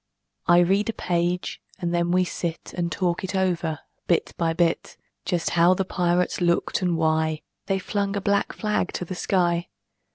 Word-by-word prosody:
I 175 +1 +7
read 195 +5 +2
a - - 0
page, 175 -1 -1 0.2
and 175 -3 -2
then 170 0 +1
we 185 +1 +3
sit 170 -1 -4
And 170 -1 -1
talk 180 +1 -1
it 190 +1 -3
over, 170 -4 0 0.3
bit 170 - +1
by 165 -1 +1
bit; 165 0 0 0.3
Just 175 -2 0
how 175 +2 +5
the 195 - -1
pirates 180 0 0
looked, 170 +2 +1
and 175 -2 +1
why 160 -1 +1 0.2
They 195 - +1
flung 200 +1 -2
a 200 - -1
black 200 +1 +1
flag 210 -3 -1
to 180 - -3
the 180 - -5
sky. 175 -2 +1
175 Hz, 175 wpm, -25 LUFS, 170-185 Hz, 0.3 s, I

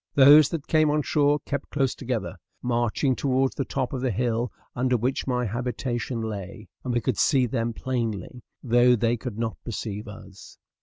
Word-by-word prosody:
Those 145 +1 +8
that 160 -3 -4
came 155 -1 +3
on 150 0 +1
shore 145 0 +2
kept 140 0 -4
close 135 -3 0
together, 115 - -4 0.3
marching 120 +2 +1
towards 135 0 +1
the 135 - -2
top 130 -1 -3
of 130 - -3
the 130 - 0
little 110 -6 -2
hill 120 -1 0 0.2
under 125 0 +1
which 125 +5 -1
my 125 -1 0
habitation 120 +1 -3
lay; 105 0 -6 0.2
and 125 - -2
we 120 0 +1
could 120 -1 -1
see 135 -4 +4
them 115 -1 -1
plainly, 115 -2 -3 0.2
though 120 0 +5
they 115 +1 +1
could 120 -2 -6
not 115 -1 -2
perceive 105 -2 -5
us. 100 -2 -12
125 Hz, 185 wpm, -25 LUFS, 115-135 Hz, 0.3 s, Those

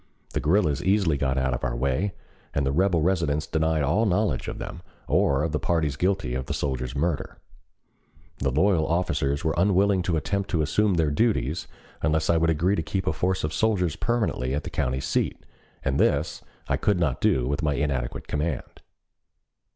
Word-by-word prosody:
The - - 0
guerrillas 75 -3 +2
easily 95 -5 +2
got 65 -1 0
out 65 -1 +1
of 65 - -4
our - - -1
way 70 +10 -1 0.4
and 70 - +1
the 65 - +1
rebel 85 +1 +2
residents 80 -5 +1
denied 80 -1 +1
all 105 +9 +2
knowledge 95 - 0
of - - -4
them - - -7 0.3
or 70 +1 +2
of 80 - -1
the 75 - 0
parties 80 -5 0
guilty 90 -6 0
of 65 +1 -3
the - - -2
soldier's 65 -2 -2
murder. 75 0 -2 1.0
The 65 - +1
loyal 80 +3 +2
officials 75 -4 0
were 80 - +2
unwilling 95 +1 +3
to 85 -2 0
attempt 100 +6 -2
to 80 -3 +1
assume 100 +6 +2
their 80 -3 +2
duties 80 - 0 0.3
unless 80 +1 +2
I 85 - +3
would 80 0 +2
agree 85 +5 +2
to 80 - 0
keep 95 +5 -3
a 80 - +1
force 95 +3 -1
of 75 0 -2
soldiers 95 -7 +1
permanently 105 - -1
at 75 - -2
the - - -6
county 65 +1 -1
seat, - - -1 0.4
and 70 0 +1
this 75 +3 +1 0.3
I - - +1
could 100 -4 +1
not 75 -7 0
do 60 -2 +2
with 70 +5 -1
my 75 -3 +1
inadequate 70 -4 -2
command. 75 -2 -3
80 Hz, 190 wpm, -25 LUFS, 70-90 Hz, 1.0 s, unwilling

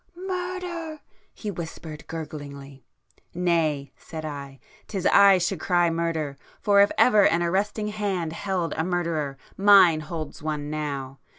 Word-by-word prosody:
'Murder!' 360 -3 -4 0.3
he 210 - -6
whispered 160 -3 -8
gurglingly. 140 -4 -8 0.5
'Nay!' 165 -5 0
said 160 -1 -8
I, 140 -3 -7 0.3
''tis 190 -3 -4
I 200 -1 +7
should 180 0 -1
cry 175 0 +2
Murder!—for 165 +4 0
if 200 - +5
ever 215 -5 +6
an 170 +1 +1
arresting 205 +4 -1
hand 195 -6 -2
held 185 -2 -2
a 160 - -1
murderer, 165 -6 -2 0.2
mine 195 -5 +7
holds 155 -1 -6
one 150 -1 -3
now! 140 -3 -4
170 Hz, 125 wpm, -25 LUFS, 150-200 Hz, 0.5 s, I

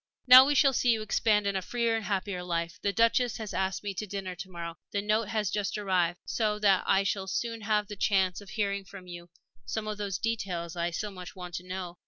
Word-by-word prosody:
Now 255 +1 +10
we 290 - +2
shall 275 -1 +5
see 245 - +1
you 225 -2 +2
expand 210 -1 +2
in 200 -1 0
a 190 - 0
freer 235 +3 0
and 220 -2 -3
happier 195 -2 -2
life. 170 -1 -3
The 200 - +1
Duchess 230 +2 +2
has 220 -3 -6
asked 190 +1 -1
me 200 -1 -3
to 210 +3 -5
dinner 195 -2 -4
to 180 +2 -8
morrow 170 -1 -7
the 200 - -1
note 210 +1 +1
has 215 -3 -1
just 205 0 -1
arrived 180 -4 0
so 215 -2 0
that 200 -3 +3
I 195 0 +4
shall 195 -1 -2
soon 230 +4 -3
have 210 0 +1
the 210 - -7
chance 190 -2 +1
of 200 - -13
hearing 200 -2 -1
from 190 0 -12
you 175 -1 -10 0.3
some 210 - -4
of 210 -1 -4
those 200 -3 -2
details 185 -7 -3
I 170 0 -1
so 205 +4 -4
much 180 -2 -9
want 180 -1 -8
to 180 - -9
know. 180 -1 -6
200 Hz, 240 wpm, -29 LUFS, 180-215 Hz, 0.3 s, Now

